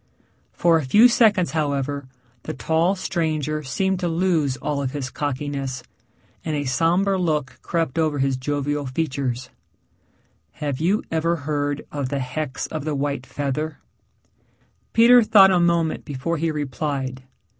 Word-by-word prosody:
For 170 -1 +3
a - - -3
few 210 - +6
seconds, 215 -7 +3
however, 145 -3 -2 0.3
the 155 - -6
tall 160 - +1
stranger 155 -5 -2
seemed 190 +7 -1
to 180 - -1
lose 165 -6 +1
all 145 -1 -2
of 130 -2 -3
his 135 -3 -4
cockiness, 140 -2 -3 0.6
and 155 -2 -2
a 145 -1 -2
somber 175 +8 +2
look 150 -6 -1
crept 165 -3 -1
over 155 -2 +1
his 135 -1 +1
jovial 145 +2 -2
features. 130 -3 -3 1.0
"Have 145 -4 -3
you 185 +7 +1
ever 165 +1 +1
heard 145 -1 -2
of 140 -3 -3
the 140 - -2
hex 130 +1 -3
of 155 -2 -5
the 155 -1 -2
white 140 -2 -2
feather?" 145 +2 -3 1.1
Peter 240 +2 +7
thought 195 -3 +6
a 180 - +3
moment 170 -2 +1
before 150 +4 -3
he 165 +2 0
replied. 140 -3 -3
150 Hz, 145 wpm, -23 LUFS, 140-170 Hz, 1.1 s, Peter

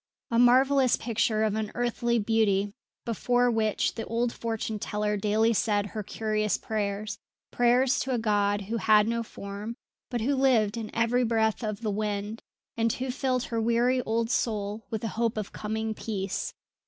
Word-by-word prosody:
A 230 - +3
marvellous 260 +1 +5
picture 220 -2 0
of 215 -2 +1
unearthly 235 +2 -1
beauty 205 -2 +1 0.3
before 245 +2 +2
which 220 -2 +1
the 225 - -5
old 235 +1 -1
fortune 225 -2 -3
teller 210 +1 -1
daily 215 +3 +2
said 205 -2 +1
her 215 +1 -5
curious 215 0 -1
prayers, 210 -1 -3 0.3
prayers 245 +2 +3
to 265 - -2
a 250 - +1
God 205 -2 +1
who 220 +4 -3
had 215 +1 +4
no 235 0 0
form, 205 0 -7 0.3
but 240 -3 -2
who 270 +6 +1
lived 240 -6 +3
in 225 -2 -5
every 235 +2 +2
breath 220 0 +1
of 215 0 -3
the 215 -2 -1
wind, 210 +1 -3 0.3
and 230 0 +1
who 255 0 -3
filled 255 -1 0
her 230 -2 -2
weary 240 +3 +2
old 230 0 -1
soul 210 -2 -1
with 220 -2 -3
the 225 - -2
hope 230 0 -1
of 210 -2 -4
coming 220 +1 -3
peace. 195 -3 -4
225 Hz, 165 wpm, -27 LUFS, 210-235 Hz, 0.3 s, marvellous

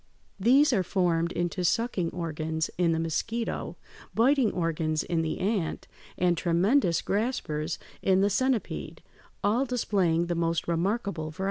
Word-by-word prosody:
These 265 +7 +5
are 200 - +3
formed 175 -2 +1
into 175 +1 -2
sucking 185 -2 +1
organs 160 -2 -3
in 175 -2 +2
the 160 - +1
mosquito, 220 +8 -2 0.4
biting 245 0 +4
organs 160 -2 -1
in 165 -2 0
the 160 -1 -2
ant, 195 -4 -2 0.3
and 175 -1 +2
tremendous 175 - +2
graspers 175 -8 -1 0.2
in 190 0 +3
the 200 - +3
centipede, 255 +2 -1 0.4
all 220 +6 +2
displaying 195 -10 +1
the 175 - -1
most 165 -1 -1
remarkable 170 -1 -1
variety. 155 - -14
175 Hz, 135 wpm, -28 LUFS, 165-220 Hz, 0.4 s, These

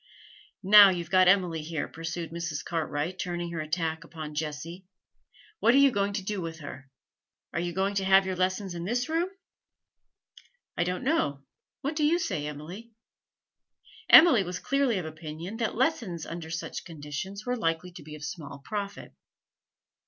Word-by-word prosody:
'Now 205 +1 +9
you've 175 -2 -3
got 185 -1 +6
Emily 180 -4 +3
here,' 155 0 -3
pursued 165 0 -5
Mrs. 170 -2 -4
Cartwright, 165 +2 -2
turning 175 -1 -3
her 165 -2 -3
attack 160 +1 -2
upon 155 -2 -8
Jessie, 155 +4 -5 0.7
'what 235 - +4
are - - +6
you 280 -1 +6
going 200 -3 0
to 200 -1 -3
do 200 0 -3
with 165 -1 -5
her? 135 -1 -9 0.6
Are - - -1
you 175 0 -2
going 195 +3 0
to 195 -1 0
have 190 0 +5
your 190 -1 -2
lessons 185 +1 -1
in 170 -1 -5
this 240 +6 -1
room?' 335 +3 0 1.5
'I 175 - +1
don't 180 0 -2
know. 145 - 0 0.4
What 285 +3 -2
do 305 - 0
you 315 +3 +4
say, 150 - -2
Emily?' 175 +11 -8 1.2
Emily 315 - +9
was 180 -1 -4
clearly 275 -5 +1
of 180 - -3
Opinion 160 +5 -7
that 230 -2 -1
lessons 205 - 0
under 165 -1 -7
such 165 +1 -5
conditions 165 +5 -6
were 250 0 0
likely 165 -4 -1
to 175 - -11
be 150 +1 -10
of 150 - -10
small 150 -2 -7
profit. 200 +7 -6
175 Hz, 165 wpm, -28 LUFS, 160-200 Hz, 1.5 s, Now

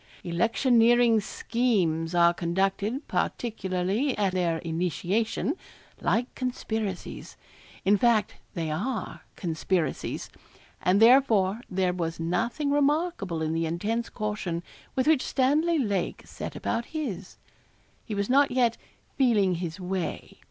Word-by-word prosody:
Electioneering 230 +5 +4
schemes 190 -8 0
are 170 0 +5
conducted, 195 - -1
particularly 205 +3 -1
at 200 -3 +1
their 175 -3 +1
initiation, 180 - -1 0.5
like 245 +2 0
conspiracies 220 -6 -4 0.5
in 205 +2 +5
fact, 225 -3 +3 0.2
they 165 -3 -2
are 220 +10 -3
conspiracies, 170 -1 -2 0.5
and 185 +3 +3
therefore 225 -4 +5
there 185 -1 +1
was 165 -2 -3
nothing 230 - -1
remarkable 290 - +1
in 155 0 -1
the 165 0 0
intense 215 +8 -2
caution 195 -5 -3 0.3
with 260 - +1
which 310 -4 +4
Stanley 300 +6 +2
Lake 205 - -1
set - - -7
about 235 - -2
his. 200 - -5 0.7
He 215 - -5
was 200 0 -1
not 275 +2 +4
yet 245 -3 +2 0.4
'feeling 215 -8 +4
his 170 +1 -4
way.' 185 -1 -4
205 Hz, 115 wpm, -27 LUFS, 180-245 Hz, 0.7 s, are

